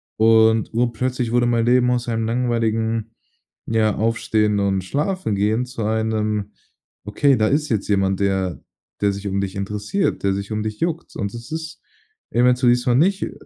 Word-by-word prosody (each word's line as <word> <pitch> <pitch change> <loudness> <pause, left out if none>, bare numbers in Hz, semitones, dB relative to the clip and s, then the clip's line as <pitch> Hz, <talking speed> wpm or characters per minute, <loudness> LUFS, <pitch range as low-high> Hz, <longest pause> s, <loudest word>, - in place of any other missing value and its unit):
Und, 110 0 +4
urplötzlich 120 +1 -1
wurde 120 0 +3
mein 120 -1 +1
Leben 125 0 +3
aus 125 -1 -1
einem 115 -1 -1
langweiligen, 115 -2 -1 0.5
ja, 110 -2 +1
Aufstehen 110 -2 +1
und 95 -1 +1
Schlafengehen 120 - -1
zu 120 -3 -6
einem, 110 -1 -1 0.5
okay, 135 +7 +2
da 110 -2 +2
ist 150 +1 +1
jetzt 105 -3 -2
jemand, 95 -1 +1
der 95 -6 -1 0.4
der 100 -1 +2
sich 100 +1 -6
um 100 0 -1
dich 95 -1 -4
interessiert, 105 - -2
der 100 -1 +2
sich 100 +2 -5
um 105 - -2
dich 110 0 -5
juckt. 170 -1 -3
Und 100 -1 -3
das 120 +4 -9
ist 160 0 -6 0.5
eventuell 125 0 +3
dieses 125 0 +1
mal 120 -1 +3
nicht 190 +7 +2
i - - -4
110 Hz, 170 wpm, -21 LUFS, 105-125 Hz, 0.5 s, Und